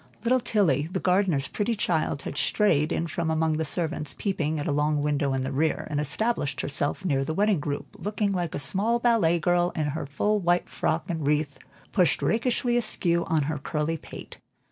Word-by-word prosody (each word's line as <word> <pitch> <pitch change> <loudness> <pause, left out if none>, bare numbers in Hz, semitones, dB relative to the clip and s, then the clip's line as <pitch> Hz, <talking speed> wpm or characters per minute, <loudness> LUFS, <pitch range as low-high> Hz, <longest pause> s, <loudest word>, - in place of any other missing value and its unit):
Little 255 +2 +3
Tilly, 170 - +1
the 185 - -1
gardener's 180 -8 +2
pretty 225 +2 -1
child, 160 -8 -1
had - - -5
strayed 155 -3 +2
in 170 - 0
from 165 0 -2
among 160 -1 +1
the 160 - 0
servants 155 -2 -3
peeping 160 -6 -1
at 145 - -3
a 160 - 0
long 150 0 +1
window 145 -1 0
in 130 - -1
the 135 - -3
rear, 155 +3 0
and 145 - 0
established 150 - -1
herself 145 +6 -1
near 135 -6 +1
the 155 +3 -3
wedding 205 -2 +2
group, 145 -1 -5
looking 205 0 -1
like 175 -4 -2
a - - -1
small 200 +11 +2
ballet 230 -9 +3
girl 175 +1 +2
in 155 - 0
her 150 0 -4
full 210 +9 0
white 175 -1 +1
frock 160 - -1
and 160 -6 -3
wreath 150 -1 0 0.3
pushed 180 -5 +2
rakishly 240 +1 +1
askew 170 -7 +1
on 160 -2 +1
her 150 +1 -2
curly 150 +3 -2
pate. 160 - -10
160 Hz, 195 wpm, -26 LUFS, 150-200 Hz, 0.3 s, Little